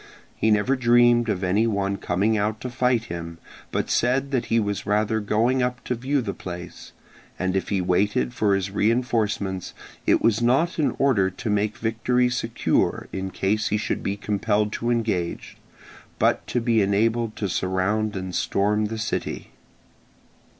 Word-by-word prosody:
He 110 - +1
never 105 +5 +3
dreamed 120 -1 +4
of 100 -2 -1
any 100 +5 +2
one 100 -2 -1
coming 100 +6 0
out 105 +1 -1
to 125 - -5
fight 125 -1 +1
him, 85 -3 -7 0.3
but - - -1
said 130 +3 +1
that 125 -3 0
he 115 - +2
was 100 -2 -2
rather 105 +1 +1
going 115 +5 +1
up 125 0 -2
to - - -2
view 130 +3 -1
the 100 -3 -3
place; 90 -1 -8 0.5
and 95 0 -1
if 95 - -1
he 100 -2 +1
waited 90 -8 +1
for 100 -2 +2
his 95 0 -2
reinforcements, 105 -4 0 0.3
it - - +4
was 115 0 +2
not 135 +9 +2
in 150 - +1
order 110 -9 +3
to 95 +4 -6
make 105 +1 0
victory 125 +2 +1
secure 115 -2 0
in 95 0 -3
case 100 +3 0
he 105 - +1
should 105 - -2
be 100 +1 -2
compelled 105 0 0
to 120 - -2
engage, 110 -8 -2 0.6
but - - +1
to 125 - 0
be 115 -2 +2
enabled 110 +3 +1
to 100 - -2
surround 95 +4 0
and 95 -1 -5
storm 105 +4 +1
the 110 +1 -4
city. 110 - -4
110 Hz, 165 wpm, -24 LUFS, 100-120 Hz, 0.6 s, dreamed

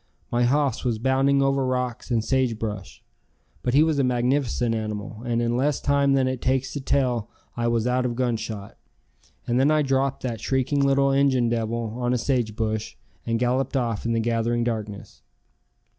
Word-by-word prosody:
My 120 0 +2
hoss 140 +2 +1
was 120 -4 0
bounding 135 +3 +2
over 135 0 +1
rocks 125 -2 -2
and 115 -3 0
sage 130 -4 +1
brush. 105 -4 -6 0.6
But 125 +1 0
he 150 - +7
was 160 -3 +1
a - - +3
magnificent 125 -1 +1
animal 110 -1 -4
and 120 0 0
in 120 0 0
less 140 +3 +1
time 140 -1 +2
than 135 -1 +2
it 130 -1 -3
takes 130 0 0
to 145 - -4
tell 125 -5 0 0.3
I 120 0 -1
was 115 -1 +1
out 125 +1 +1
of 120 - -3
gunshot, 115 -5 -3 0.7
and 120 +1 +1
then 135 +3 +4
I 155 -1 +3
dropped 135 0 0
that 120 -3 -3
shrieking 135 +2 0
little 140 0 +3
Injun 135 -3 +3
devil 115 -1 -2
on 125 0 0
a - - +2
sage 120 -3 -1
bush 110 -1 -2 0.3
and 115 0 +1
galloped 125 +3 0
off 115 -5 -1
in 115 - 0
the 115 - +1
gathering 115 +1 0
darkness. 105 - -5
125 Hz, 185 wpm, -24 LUFS, 115-135 Hz, 0.7 s, he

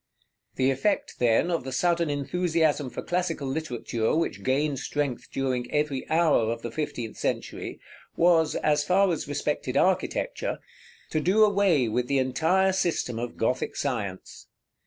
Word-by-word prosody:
§ - - -59 0.5
XVIII. 130 - +1
The 135 - +4
effect, 135 +10 0
then, 120 +8 +3
of 165 -6 -1
the 130 - -6
sudden 170 +3 +1
enthusiasm 155 0 0
for - - -6
classical 175 -5 -1
literature, 125 -5 -2
which 165 - -1
gained 140 +1 0
strength 140 -2 -3
during 130 -2 -2
every 150 -3 -1
hour 155 -9 +3
of 115 0 -5
the 120 - -4
fifteenth 120 -6 -4
century, - - -3 0.4
was, 165 -2 +3
as 150 -1 +2
far 185 +4 +3
as 160 - -4
respected 145 -2 -2
architecture, 190 - 0 0.5
to 155 - +1
do 190 +7 +4
away 195 - +3
with 120 +3 -1
the 140 - +1
entire 165 +9 +2
system 170 -10 -1
of 120 0 -5
Gothic 120 +3 -1
science. 105 -9 -4
145 Hz, 155 wpm, -26 LUFS, 125-170 Hz, 0.5 s, The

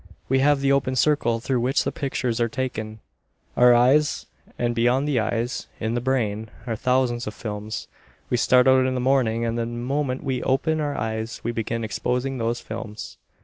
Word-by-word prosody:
We 135 0 +3
have 140 0 +3
the 140 0 +2
open 130 -1 +1
circle 130 -5 +2
through 125 +2 -1
which 130 +5 +1
the - - -1
pictures 125 -4 -2
are 115 - +2
taken, 110 -3 -4 0.5
our 125 0 +6
eyes, 135 +5 +3 0.3
and 120 0 0
beyond 125 +4 +2
the 140 -5 +2
eyes, 115 +2 -2
in 110 0 -1
the 120 - -1
brain, 110 -4 -1 0.2
are 115 -3 -2
thousands 125 0 0
of 105 - -5
films. 105 0 -5 0.4
We - - 0
start 125 +1 +4
out 130 0 +5
in 130 - -1
the - - -1
morning 125 -3 +2
and 115 0 -1
the 115 - -1
moment 130 +3 -2
we 130 -3 -1
open 155 +4 +1
our 145 -1 -1
eyes 110 0 -3
we 120 - -1
begin 115 0 -3
exposing 125 +4 -2
those 115 +1 -1
films. 110 -1 -7
120 Hz, 190 wpm, -24 LUFS, 115-130 Hz, 0.5 s, our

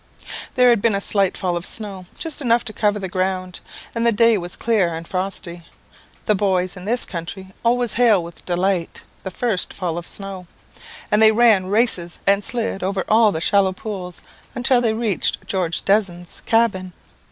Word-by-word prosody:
"There 250 -1 +5
had 235 -4 +3
been 225 -2 +2
a - - 0
slight 200 -1 +2
fall 180 -2 -1
of 170 - -3
snow, 195 -3 -5
just 320 -2 -3
enough 235 -2 +2
to 215 - -6
cover 210 0 +1
the 195 -2 -4
ground, 185 0 -2 0.3
and 230 - -2
the 235 - +4
day 230 +1 +4
was 175 -3 -4
clear 200 -8 +1
and 165 +1 -7
frosty. 180 -2 -4 0.6
The 215 - +3
boys 185 -2 0
in 180 0 -9
this 235 +4 0
country 190 +2 -7
always 240 0 +2
hail 225 -7 +4
with 170 0 -10
delight 180 -1 -1 0.2
the 190 - -5
first 205 0 -1
fall 175 -3 -3
of 170 - -10
snow; 195 -3 -7 0.6
and 210 - +4
they 220 0 +8
ran 220 -4 +4
races 195 -5 0
and 200 +1 +3
slid 225 -3 -1
over 190 0 -2
all 220 -1 +5
the 160 - -4
shallow 195 0 +2
pools, 185 -3 -6 0.3
until 245 +1 +3
they 225 -2 +1
reached 220 -5 -1
George 180 -4 -2
Desne's 185 -4 0
cabin. 200 -6 +1
195 Hz, 180 wpm, -20 LUFS, 180-225 Hz, 0.6 s, they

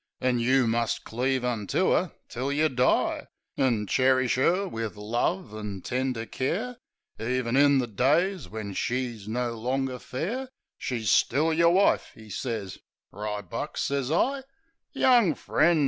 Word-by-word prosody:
An' 125 -1 +1
you 130 +2 +3
must 115 0 0
cleave 130 +2 -1
unto 115 -5 0
'er - - +1 0.2
till 130 +4 -3
yeh 155 +2 +2
die. 130 -1 +1 0.3
An' 120 -6 +1
cherish 130 +3 +3
'er 180 +9 +2
wiv 115 - -5
love 120 - -1
an' 105 -3 -6
tender 125 -2 -2
care. 215 - -2 0.4
E'en 120 +1 -1
in 140 0 +5
the 130 - +1
days 150 - +1
when 105 -2 -5
she's 120 -2 -2
no 120 +1 -1
longer 130 +2 -2
fair 230 - -4 0.3
She's 115 -4 -1
still 155 +6 +3
yer 170 +1 +4
wife," 190 +4 +3
'e 110 -1 -12
sez. 110 -3 -4 0.3
"Ribuck," 105 -2 -5
sez 140 -2 -1
I. 270 - +1 0.5
"Young 240 - +4
friend!" 170 0 +2
130 Hz, 140 wpm, -27 LUFS, 115-150 Hz, 0.5 s, in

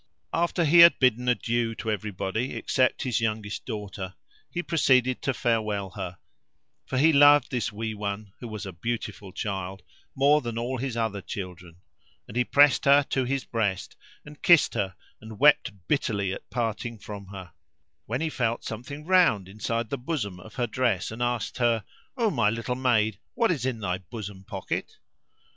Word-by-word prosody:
After 170 0 +1
he 165 +3 +6
had 170 0 +9
bidden 125 -1 +2
adieu 120 -1 0
to 110 - -3
everybody 105 +3 -3
except 130 +2 +1
his 125 -5 0
youngest 110 -2 -2
daughter, 100 -4 -6 0.3
he 175 - -3
proceeded 130 -7 +2
to 135 - 0
farewell 105 -6 -1
her; 95 -3 -6 0.7
for 130 - -2
he 155 +4 +5
loved 145 -1 +6
this 120 -5 -1
wee 110 +1 -4
one, 100 -1 -5
who 120 - -7
was 110 -2 -6
a 95 - -7
beautiful 105 0 -4
child, 95 -1 -4 0.3
more 145 +3 +4
than 120 -3 -5
all 125 +2 -2
his 130 -2 -3
other 110 -3 -1
children; 90 -3 -8 0.5
and 105 - -11
he 125 - +3
pressed 145 +3 +4
her 140 +1 +6
to 130 -2 +1
his 135 +1 -1
breast 105 -5 -2 0.3
and 150 0 -13
kissed 170 -4 +5
her 95 -5 -2 0.3
and 110 -1 -10
wept 145 -2 +5 0.2
bitterly 100 -9 0
at - - -9
parting 115 0 -3
from 100 -1 -9
her; 95 -4 -10 0.5
when 125 +6 -2
he 160 - 0
felt 120 -3 -1
something 135 +7 -7
round 170 - +4
inside 110 +3 -3
the 140 - -2
bosom 120 - -3
of 105 +4 -13
her 120 - 0
dress 115 -5 0
and 110 +2 -7
asked 120 0 -1
her, 115 -3 +2 0.3
"O 230 -4 +2
my 115 -7 +2
little 115 +3 -2
maid, 110 -5 +1 0.2
what 230 -3 +3
is 135 -7 -1
in 125 -3 -2
thy 90 -2 -1
bosom 95 0 -8
pocket?" - - -5
115 Hz, 175 wpm, -26 LUFS, 100-130 Hz, 0.7 s, had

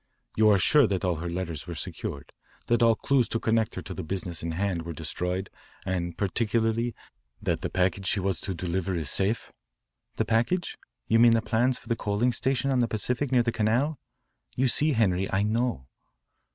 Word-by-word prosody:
You 110 0 +5
are 100 - +6
sure 145 +6 +5
that 95 -1 -1
all 90 -3 0
her 85 +2 -4
letters 85 -3 -4
were 85 - -5
secured, - - -5 0.3
that 120 0 +2
all 115 -1 +5
clues 135 +1 +1
to 115 - -1
connect 110 -1 +1
her - - -5
with - - -6
the - - -2
business 85 -2 -3
in 85 0 -3
hand 95 -1 -1
were 85 0 -6
destroyed, 90 +5 -3 0.3
and 85 -3 -2
particularly 115 +3 0 0.4
that - - -1
the - - -2
package 95 +1 0
she 100 - +2
was 95 -2 -1
to 95 - -4
deliver 90 +2 -2
is 80 -4 -2
safe?" 100 +4 0 0.6
"The - - 0
package? 120 +11 0 0.3
You 115 - +4
mean 120 0 +7
the 115 - +3
plans 120 +3 +1
for - - -16
the 115 - +1
coaling 105 +3 0
station 135 +2 0
on 130 - +2
the 120 - +2
Pacific 125 +5 -2
near 125 -2 +4
the 115 - 0
Canal? 120 +7 +1 0.6
You 130 +1 +2
see, 150 +5 +3
Henri, 95 -5 +1
I 95 +1 +2
know." 115 - 0
110 Hz, 195 wpm, -27 LUFS, 90-120 Hz, 0.6 s, mean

